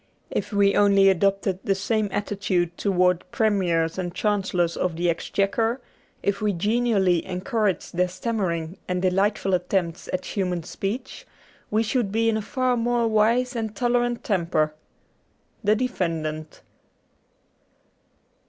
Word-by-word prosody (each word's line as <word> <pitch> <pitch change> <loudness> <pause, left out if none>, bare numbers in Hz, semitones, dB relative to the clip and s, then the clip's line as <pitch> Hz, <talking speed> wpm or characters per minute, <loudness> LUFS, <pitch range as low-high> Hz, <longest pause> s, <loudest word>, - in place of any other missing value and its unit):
If - - -2
we 200 -1 +3
only 200 -1 +5
adopted 195 0 +1
the 195 - +1
same 210 +2 0
attitude 190 -4 -1
towards 180 -3 +2
Premiers 180 -6 +1
and 175 -1 -4
Chancellors 190 -5 0
of 180 -3 -1
the 175 +1 +1
Exchequer, 205 +8 0 0.4
if 200 0 0
we 210 -1 +1
genially 200 -2 +2
encouraged 195 0 -2
their 180 +1 +2
stam 225 +6 -3
mering 170 -2 -2
and 180 0 -1
delightful 195 +1 +1
attempts 180 -1 -1
at 185 - -2
human 180 -4 -2
speech, 200 +9 -5 0.4
we 215 +2 +2
should 225 -2 0
be 225 +2 +2
in 220 - +1
a - - -2
far 255 +3 0
more 240 0 +1
wise 230 +4 +2
and 220 -2 -3
tolerant 240 +1 0
temper. 170 - 0 0.5
' - - -41
The 210 +1 +4
Defendant.' 165 -10 -3
195 Hz, 135 wpm, -24 LUFS, 180-220 Hz, 0.5 s, only